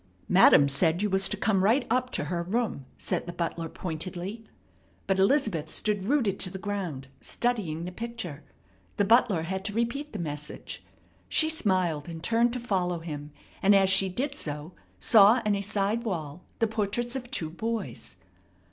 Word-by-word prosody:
"Madam 140 - +7
said 160 +6 +2
you 210 - 0
was 190 0 +3
to - - -2
come 195 -4 +1
right 240 +6 +3
up 255 +1 +1
to - - -2
her 175 -1 -2
room," 190 - -2
said - - -2
the - - -3
butler 170 -1 -3
pointedly. 185 +6 -5 0.6
But 195 -1 +1
Elizabeth 195 - +2
stood 205 +1 -1
rooted 225 -6 +1
to 185 - +3
the 190 - -6
ground, 185 -10 -4
studying 190 -10 -1
the 180 - -5
picture. 180 -9 -6 0.5
The 205 - +3
butler 215 -6 +4
had 190 +3 -3
to 205 - -2
repeat 240 +7 -2
the 215 - -5
message. 150 -4 -6 0.5
She 315 - +3
smiled 185 - 0
and 165 -1 -8
turned 230 +4 +2
to 250 - -3
follow 185 -7 -1
him, 150 -3 -7 0.3
and 200 +1 +5
as 195 -1 +4
she 190 0 +4
did 275 +9 -2
so 150 - -6 0.2
saw 220 +1 +6
on 210 - +2
a 200 - -1
side 205 +3 -1
wall 170 -6 -4
the 230 - +2
portraits 220 +3 -1
of 245 -2 -5
two 160 - -2
boys. 215 - -4
195 Hz, 175 wpm, -28 LUFS, 170-230 Hz, 0.6 s, Madam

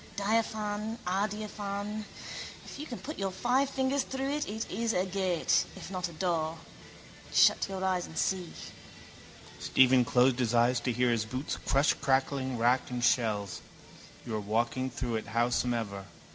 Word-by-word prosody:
Diaphane, 215 +1 -1
adiaphane. 205 +2 -2 0.6
If - - -9
you 300 - -5
can 240 - -5
put 305 -3 -7
your 195 -1 0
five 250 +8 +1
fingers 270 +1 +1
through 265 +1 -3
it 295 +1 -1
it 220 +2 -3
is 225 +3 0
a 180 +1 +1
gate, 185 -3 +1
if - - -9
not 180 -2 -2
a - - -11
door. 160 -1 -1 0.7
Shut - - +5
your 190 -1 -3
eyes 185 -2 0
and 160 - -10
see. 180 -1 0 1.1
Stephen 130 -1 +5
closed 125 +1 +3
his 120 -1 +1
eyes 120 +1 +4
to 125 +1 -1
hear 125 +1 +2
his 115 -2 +1
boots 130 +6 -3
crush 140 +2 +4
crackling 130 -1 0
wrack 120 +3 +2
and 125 -1 -3
shells. 105 -5 +1 0.6
You 115 - -5
are 110 - 0
walking 120 +5 0
through 120 -2 -2
it 110 - -6
howsomever. 115 -3 0
165 Hz, 160 wpm, -30 LUFS, -, 1.1 s, Shut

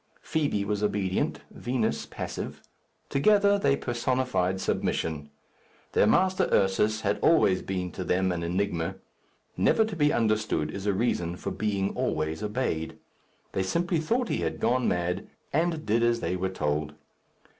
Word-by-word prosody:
Fibi 145 -10 0
was 105 0 -1
obedient; 100 -3 0
Vinos, 120 -3 -1
passive. - - -5 0.5
Together, 200 +7 +4
they 140 -7 +3
personified 120 -6 0
submission. 75 -5 -1 0.6
Their - - +4
master, 185 - +3
Ursus, 105 +3 +2
had 105 -1 0
always 125 - +4
been 90 -2 -3
to - - -5
them 95 +1 +1
an 85 -1 -2
enigma. 90 0 -1 0.6
Never 220 - +3
to 215 -3 -5
be 150 -2 +3
understood 110 - +1
is 100 +3 -5
a 100 - +3
reason 90 -6 0
for - - -4
being 100 -2 -1
always 80 +1 -1
obeyed. 105 -7 -2 0.5
They 95 - -1
simply 170 - 0
thought 235 +10 0
he - - 0
had - - -2
gone 125 +2 +2
mad, 90 +2 -1 0.3
and 160 +1 0
did 115 +2 +2
as 120 0 +2
they 90 - -1
were 95 +1 -1
told. 75 -4 -2
105 Hz, 145 wpm, -27 LUFS, 90-130 Hz, 0.6 s, Together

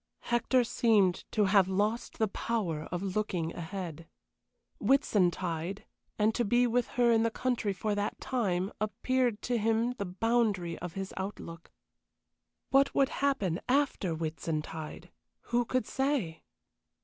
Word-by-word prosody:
Hector 245 +1 +3
seemed 210 -6 +2
to 210 -2 +2
have 195 -1 +5
lost 210 +5 -1
the 220 - +2
power 190 -8 -2
of 175 +2 -2
looking 180 -6 -1
ahead. 170 -2 -6 0.7
Whitsuntide, 185 - +1 0.3
and 215 +1 +3
to 240 - +1
be 240 +3 +3
with 245 0 +1
her 240 -1 +5
in 225 -1 +4
the 230 - +2
country 240 -3 -1
for 210 +2 -2
that 205 0 -2
time, 195 -7 -1
appeared 240 +1 0
to 245 -1 0
him 225 +2 +2
the 200 - -1
boundary 195 -3 0
of 180 -2 -6
his 195 0 -5
outlook. 185 -3 -6 1.0
What 275 +1 +4
would 275 -1 +4
happen 270 -12 0
after 255 - +1
Whitsuntide? 160 +1 -4 0.4
Who 240 0 +3
could 255 +2 0
say? 265 - -1
210 Hz, 135 wpm, -30 LUFS, 180-240 Hz, 1.0 s, have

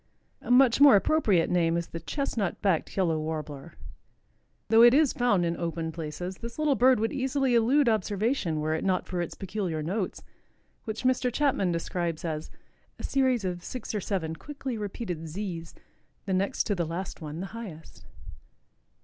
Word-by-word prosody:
A - - -10
much 250 +1 +5
more 285 -6 +9
appropriate 200 - +3
name 170 -1 +2
is 170 - -2
the 165 - -6
Chestnut 215 - -2
backed 190 -3 0
Yellow 165 -5 +2
Warbler. 155 -1 -5 1.0
Though 225 0 +6
it 240 +2 +8
is 295 -2 +4
found 220 -8 +2
in 170 0 0
open 165 -1 -3
places, 170 +3 -5
this 235 0 -8
little 305 -2 +2
bird 255 -2 +4
would 225 +4 -1
easily 270 -1 0
elude 245 +5 +4
observation 210 - 0
were 155 +1 0
it 160 - -2
not 185 -1 +1
for 180 -1 -3
its 175 - -5
peculiar 185 -5 -3
notes, 185 +4 -3 0.6
which 220 0 -5
Mr. 255 -1 +2
Chapman 250 -9 +1
describes 170 -1 -3
as 155 -1 -4 0.5
"a - - -10
series 260 -6 +1
of 175 -1 -3
six 250 -3 -6
or 210 - -1
seven 170 -5 -2
quickly 270 - -6
repeated 195 -6 -5
zees, 170 -1 -6 0.5
the 195 - -1
next 190 +2 +1
to 210 - -1
the 175 -3 -1
last 175 +3 -5
one 155 +1 -6
the 190 - -3
highest." 195 -9 -9
195 Hz, 170 wpm, -28 LUFS, 165-240 Hz, 1.0 s, more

